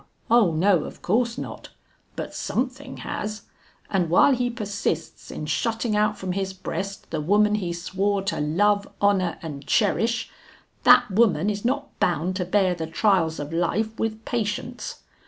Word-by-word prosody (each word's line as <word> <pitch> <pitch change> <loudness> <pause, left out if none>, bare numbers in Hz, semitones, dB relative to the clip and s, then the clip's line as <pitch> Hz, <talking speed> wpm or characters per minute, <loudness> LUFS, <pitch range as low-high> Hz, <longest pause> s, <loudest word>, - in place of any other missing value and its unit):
O 230 -7 +5
no, 175 +1 +3
of - - -10
course 235 +5 +1
not! - - -7 0.5
But - - -5
something 260 +2 -3
has, 215 0 -4 0.4
and 180 -4 0
while 185 +11 +6
he 245 -1 0
persists 205 -8 -3
in 155 - -5
shutting 225 +7 -1
out 210 0 +2
from 185 -1 -4
his 190 0 -2
breast 190 +1 -5
the 160 -2 -1
woman 210 +6 +3
he 190 -5 -1
swore 195 +3 -1
to 200 - -2
love, 200 +7 +2
honor, 195 -4 +2
and 145 -3 -6
cherish, 225 +1 +1 0.5
that 245 -2 +7
woman 210 -1 +3
is 205 0 -5
not 265 +4 -2
bound 175 +2 +1
to 180 - -1
bear 185 0 +2
the 165 -2 -4
trials 165 -2 +2
of 145 +2 -5
life 215 +6 -1
with 220 0 -2
patience. 235 +2 -3
200 Hz, 155 wpm, -24 LUFS, 175-225 Hz, 0.5 s, that